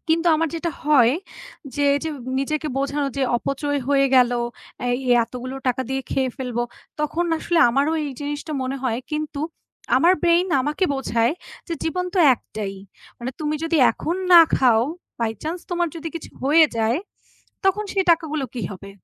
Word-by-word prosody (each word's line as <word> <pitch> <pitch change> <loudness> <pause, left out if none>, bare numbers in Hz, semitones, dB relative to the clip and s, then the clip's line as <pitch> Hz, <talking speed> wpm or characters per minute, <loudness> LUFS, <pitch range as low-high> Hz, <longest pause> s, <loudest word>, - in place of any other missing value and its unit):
কিন্তু 330 +2 +2
আমার 325 +1 +1
যেটা 335 0 -2
হয়, 265 -5 +5 0.6
যে 290 - -1
এইযে 315 +3 -2 0.3
নিজেকে 305 +2 -1
বোঝানো 280 +1 -1
যে 275 - 0
অপচয় 285 +3 -2
হয়ে 275 -1 +4
গেলো, 245 -1 +4 0.5
এই 245 +1 +1 0.2
এতগুলো 250 +3 -6
টাকা 255 +1 0
দিয়ে 265 0 -1
খেয়ে 260 -1 0
ফেলবো, 245 -3 -2 0.4
তখন 320 +3 0
আসলে 345 0 0
আমারও 280 +6 +1
এই 285 - -4
জিনিসটা 295 +2 -4
মনে 260 +1 -3
হয় 240 -2 0
কিন্তু 300 -1 -3 0.6
আমার 350 +2 +5
brain 345 +1 +4
আমাকে 300 +8 0
বোঝায়, 235 -1 +1 0.4
যে 335 - -1
জীবন 360 +3 -1
তো 375 - +1 0.2
একটাই, 210 -3 -6 0.4
মানে 245 +2 -4
তুমি 305 0 -1
যদি 330 0 +1 0.2
এখন 340 +3 -3 0.2
না 340 - +11 0.2
খাও, 235 -4 +4 0.4
by 225 -1 +1
chance 335 +3 -4
তোমার 345 -1 0
যদি 330 0 -5
কিছু 335 - -7
হয়ে 305 +4 +6
যায়, 225 +5 +1 0.7
তখন 390 +2 +2
সেই 385 -2 +1
টাকাগুলো 310 -4 +1
কি 240 - -4
হবে? 195 +1 -10
290 Hz, 165 wpm, -22 LUFS, 255-325 Hz, 0.7 s, না